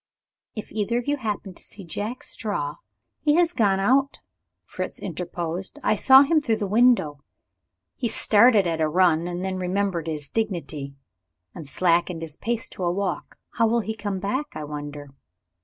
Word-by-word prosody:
"If 215 - -7
either 220 +2 0
of 245 - -2
you 290 0 +1
happen 210 -6 -4
to - - -14
see 205 - -11
Jack 205 +8 -5
Straw 150 -10 -3 0.2
" - - -55
"He 295 -1 +4
has 345 0 +3
gone 200 - +2
out," 265 +7 +2 0.5
Fritz - - -5
interposed. 175 0 -5
"I - - +3
saw 265 +6 +7
him 310 +2 +2
through 230 -6 +1
the 215 -1 -3
window. 210 - +3 0.8
He 245 - -1
started 215 -1 +4
at 165 -2 -1
a 155 - +2
run 170 -1 +3
and 175 +1 -4
then 190 -1 -3
remembered 185 -2 -1
his 150 -3 -4
dignity, 165 -9 -3 0.6
and 150 -4 -7
slackened 170 0 +1
his 155 -2 -4
pace 230 +5 -2
to 185 - -6
a 175 - +2
walk. 185 -4 -3 0.2
How 230 -1 +4
will 235 +1 +2
he 220 +1 -4
come 205 -2 -3
back, 255 +10 -2
I 155 - -5
wonder?" 145 -1 -7
195 Hz, 175 wpm, -24 LUFS, 170-225 Hz, 0.8 s, saw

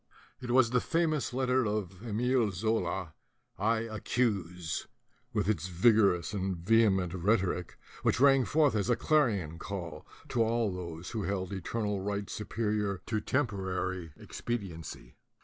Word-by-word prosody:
It 125 - -6
was 120 -2 +4
the 125 -1 +3
famous 165 -4 0
letter 130 0 +2
of 100 -3 -3
Emile 120 +1 +1
Zola, 95 -3 -1 0.5
"I 110 +1 +2
accuse," 100 -7 -1 0.4
with - - 0
its 95 -4 0
vigor 100 +2 +5
ous 85 +4 -6
and 95 -2 -1
vehement 95 -2 +3
rhetoric, 95 -1 0 0.2
which - - +2
rang 135 -1 +6
forth 150 -2 +3
as 105 +1 0
a 120 - +4
clarion 105 - +1
call 85 -7 -6 0.2
to 120 - +1
all 115 -1 +2
those 85 -2 -6
who 110 - -2
held 95 -1 -2
eternal 105 +2 -2
right 100 0 -3
superior 105 -2 -2
to 110 -2 -1
temporary 95 - -1
expediency. 85 - -6
105 Hz, 135 wpm, -31 LUFS, 95-115 Hz, 0.5 s, rang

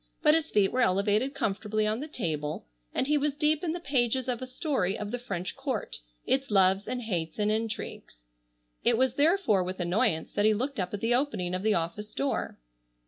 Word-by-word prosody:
But 300 -1 +6
his 320 0 +1
feet 200 -2 +3
were 255 - +1
elevated 210 +6 +2
comfortably 215 -2 -1
on 215 +2 0
the 295 - -5
table 155 - -3 0.3
and - - 0
he 295 +1 +2
was 285 0 0
deep 300 +1 +1
in 335 - 0
the 350 - -4
pages 260 -4 +1
of 250 -1 -2
a 255 - -4
story 255 - -1
of 210 0 -5
the 245 - -2
French 195 -6 -4
Court, 265 -5 -3 0.3
its 270 +1 +1
loves 195 -1 +4
and 250 -1 -3
hates 170 -7 -3
and 210 0 +1
intrigues. 220 - -4 0.7
It - - +4
was 260 0 +2
therefore 290 - +3
with 185 +1 -5
annoyance 175 -2 +1
that 205 - +2
he 215 0 +5
looked 260 +3 -2
up 185 +2 -2
at 200 - -7
the 230 +1 +2
opening 220 -9 0
of 185 - -1
the 215 +1 +2
office 170 +6 -3
door. 275 0 -2
220 Hz, 205 wpm, -28 LUFS, 195-270 Hz, 0.7 s, But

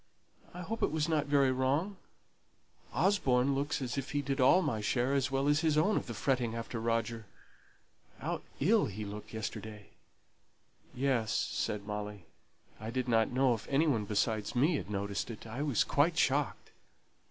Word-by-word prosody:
I 180 - -8
hope 225 +5 -4
it - - +3
wasn't 155 -1 0
very 140 -2 +4
wrong. 140 +10 0 0.9
Osborne 140 - +2
looks 140 0 -1
as 125 +2 -2
if 135 - -6
he 145 0 0
did 135 0 -1
all 180 +9 +6
my 120 -9 -1
share 125 +5 +1
as 140 0 +1
well 135 +1 0
as 145 +1 +4
his 155 -2 +2
own 200 +8 +3
of - - -1
the 120 - -5
fretting 120 -1 0
after 115 0 -4
Roger. 115 -1 -1 0.9
How - - -3 0.2
ill 205 +9 +3
he 105 +1 -5
looked 105 +1 -8
yesterday!" 110 -1 -6 1.1
"Yes," 125 -4 +1
said 105 -2 -1
Molly; 105 -2 -5 0.5
"I 110 +1 -5
didn't 115 -2 +1
know 130 0 +3
if 110 - -6
any 140 +4 +3
one 115 -9 +1
besides 105 +2 -1
me 150 +6 +3
had - - -6
noticed 100 +1 -3
it. 115 -1 -8
I 115 +5 -5
was 145 -6 +2
quite 160 +4 +2
shocked." 140 0 0
130 Hz, 165 wpm, -32 LUFS, 110-145 Hz, 1.1 s, all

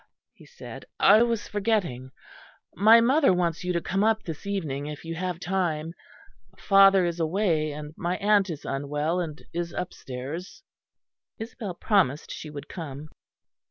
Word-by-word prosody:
he - - -18
said, 485 - -10 0.2
"I 210 +3 +7
was 235 -2 0
forgetting. 195 - -1 0.6
My 220 +4 +7
mother 270 +3 +4
wants 175 -2 0
you 180 - -1
to 170 - +1
come 195 +4 -1
up 220 0 +2
this 165 +4 -7
evening, 150 -8 -3
if 150 +2 -8
you 165 - -4
have 180 0 -3
time. 170 -4 -2 0.6
Father 195 -1 +5
is 170 0 -2
away, 165 -2 +1
and 150 +1 -8
my 180 +1 -2
aunt 205 -1 +3
is 155 -4 -6
unwell 145 +5 -1
and 160 -3 -5
is 170 0 -3
upstairs." 165 - -6 0.7
Isabel 220 -4 -6
promised 175 - +1
she 155 - -7
would 145 0 -8
come. 155 -3 -8
175 Hz, 150 wpm, -26 LUFS, 155-200 Hz, 0.7 s, I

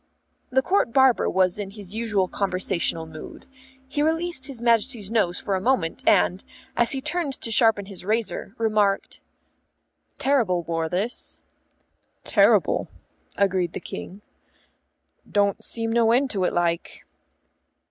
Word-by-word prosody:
The 265 +1 +2
Court 370 -9 +1
Barber 265 -1 +4
was 185 +1 +1
in 200 -2 -4
his 200 -2 -10
usual 215 -4 0
conversational 185 -4 0
mood. 155 -1 -11 0.4
He 290 +2 -2
released 325 -2 0
his 270 -4 -7
Majesty's 230 -2 +1
nose 190 -6 +1
for 200 - -3
a 190 - 0
moment, 200 -8 0
and, 185 +2 +3 0.3
as 240 +2 +4
he 270 - -2
turned 300 0 -1
to 230 - -4
sharpen 220 -3 +3
his 195 -2 -8
razor, 215 0 -2
remarked, 210 -3 0 1.0
"Terrible 225 -11 +1
war, 165 -1 -2
this." 200 +8 -3 0.8
"Terrible," - - +3 0.5
agreed 185 -3 +1
the - - -4
King. 200 +3 -8 1.1
"Don't 200 -1 +1
seem 225 -1 -3
no 230 -1 +3
end 260 +3 +2
to 190 -4 0
it, - - 0
like." 170 -1 -2
210 Hz, 135 wpm, -24 LUFS, 185-245 Hz, 1.1 s, Barber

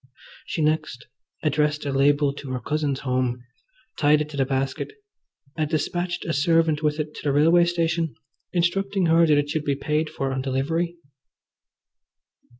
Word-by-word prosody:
She 160 - -1
next 155 -5 -1 0.4
addressed 150 0 +1
a 140 - -1
label 140 +1 +3
to 140 -1 -9
her 125 - -2
cousin's 145 +2 -2
home, 125 -2 -1 0.6
tied 150 0 +4
it 150 0 -3
to 145 - -8
the 135 -2 +1
basket, 135 - -2 0.6
and 155 -2 -1
despatched 175 +3 -2
a 165 - -1
servant 160 +1 +2
with 150 0 0
it 150 0 -3
to - - -7
the 145 - +2
railway 165 +5 +5
station, 165 -2 0 0.4
instructing 195 +2 +1
her 165 0 +5
that 150 -2 +4
it 145 0 0
should 155 -1 -1
be 140 -2 0
paid 150 +3 -1
for 135 -1 -3
on 130 - -2
delivery. 155 +6 -1
150 Hz, 160 wpm, -24 LUFS, 140-165 Hz, 0.6 s, railway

